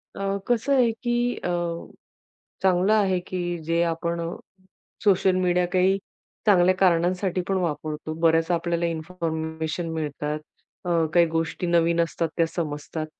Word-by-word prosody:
अ, 195 0 -1
कसं 245 +3 +1
आहे, 245 -3 +4
की 240 +1 -1
अ, - - -1 1.1
चांगलं 190 +2 +3
आहे, 195 -4 +3
की 175 -1 -3
जे 165 +2 +1
आपण 170 0 -1
अ, 165 0 -4 0.7
सोशल 190 -2 +4
मीडिया 180 -1 +2
काही 190 +1 +3 0.5
चांगल्या 185 -3 +5
कारणांसाठी 185 0 +2
पण 195 - +1
वापरतो. 155 -2 -3
बऱ्याच 165 0 +3
आपल्याला 170 0 0
इन्फॉर्मेशन 160 -1 -3
मिळतात, 150 -1 -3 0.5
अ, 170 -2 +2
काही 175 -1 +6
गोष्टी 165 +2 -2
नवीन 170 0 +3
असतात, 165 0 -1
त्या 165 - +4
समजतात. 155 -1 -4
175 Hz, 130 wpm, -25 LUFS, 165-185 Hz, 1.1 s, काही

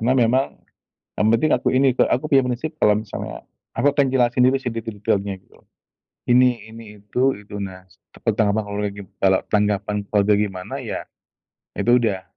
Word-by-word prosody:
Karena 120 +3 +2
memang 125 +3 +3 0.7
yang 105 - +3
penting 145 +7 +2
aku 125 - 0
ini, 135 0 +4
Kak, - - +2
aku 130 - 0
punya 135 - +6
prinsip 130 +6 -3
kalau 105 -1 +5
misalnya 110 -1 -6 0.3
aku 145 0 +3
akan 140 -1 +3
jelasin 125 -1 +3
dulu 135 - +3
sih 130 -3 -4
detil-detilnya 105 -3 -2
gitu - - -24
loh. - - -35 0.6
Ini, 120 -3 +3
ini, 110 -2 -12
itu, 130 +6 +1
itu, 105 0 -11
nah 95 -1 -7
s 90 - -24 0.3
tentang 105 -2 +2
apa 110 - 0
kalau 100 0 -5
lagi 100 -1 -4 0.2
kalau 95 -1 +3
tanggapan 105 0 +1
keluarga 105 0 +2
gimana, 95 -3 -3
ya - - -5 0.7
itu 120 +1 +4
udah 100 -5 -1
110 Hz, 180 wpm, -21 LUFS, 100-125 Hz, 0.7 s, punya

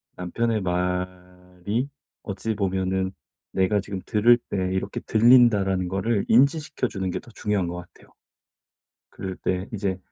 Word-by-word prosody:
남편의 110 +4 -1
말이 90 +4 -3 0.3
어찌 105 +2 -3
보면은 95 -1 -1 0.4
'내가 95 +2 +2
지금 100 -1 -5
들을 120 +3 +5
때 - - -2 0.2
이렇게 95 +1 -2
들린다.'라는 110 -6 +4
거를 100 +3 0
인지시켜 140 +2 +3
주는 95 -4 -3
게 - - -2
더 120 - -16
중요한 105 -4 -1
것 85 - -4
같아요. 90 - -13 1.0
그럴 95 -1 -6
때 95 +1 -2
이제 95 -3 -1
95 Hz, 280 characters per minute, -25 LUFS, 90-110 Hz, 1.0 s, 들을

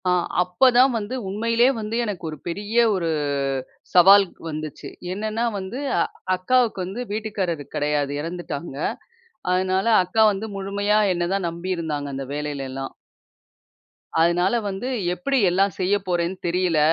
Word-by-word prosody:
ஆ, - - +4 0.3
அப்ப 180 +9 +3
தான் 260 +2 +6
வந்து 215 +3 -4
உண்மையிலேயே 230 +5 +2
வந்து 215 +1 -4
எனக்கு 200 -6 -5
ஒரு 155 - -7
பெரிய 205 +6 -4 0.2
ஒரு 175 -4 -1 0.8
சவால்க் 195 +1 +6
வந்துச்சு. 155 -2 -6 0.2
என்னென்னா 215 +3 -2 0.2
வந்து, 190 +7 -6 0.6
அக்காவுக்கு 225 +3 +2
வந்து 195 +7 -5
வீட்டுக்காரர் 200 -7 -2
கிடையாது. 145 -1 0
எறந்துட்டாங்க. 165 -3 -5 0.8
அதனால 185 +1 +1 0.2
அக்கா 200 +5 +2
வந்து 205 +2 -4
முழுமையா 200 +2 +1
என்ன 175 -1 -1
தான் 195 -3 0
நம்பியிருந்தாங்க. 165 -4 -3
அந்த 135 0 -4
வேலையில 145 -2 -3
எல்லாம். 135 0 -5 1.3
அதனால 175 +4 +3 0.2
வந்து, 195 +5 -4 0.3
"எப்பிடி 270 +10 -1
எல்லாம் 195 +2 +2
செய்ய 190 +2 +2
போறேன்னு 175 +1 0
தெரியல. 175 -2 +1
185 Hz, 130 wpm, -23 LUFS, 170-210 Hz, 1.3 s, தான்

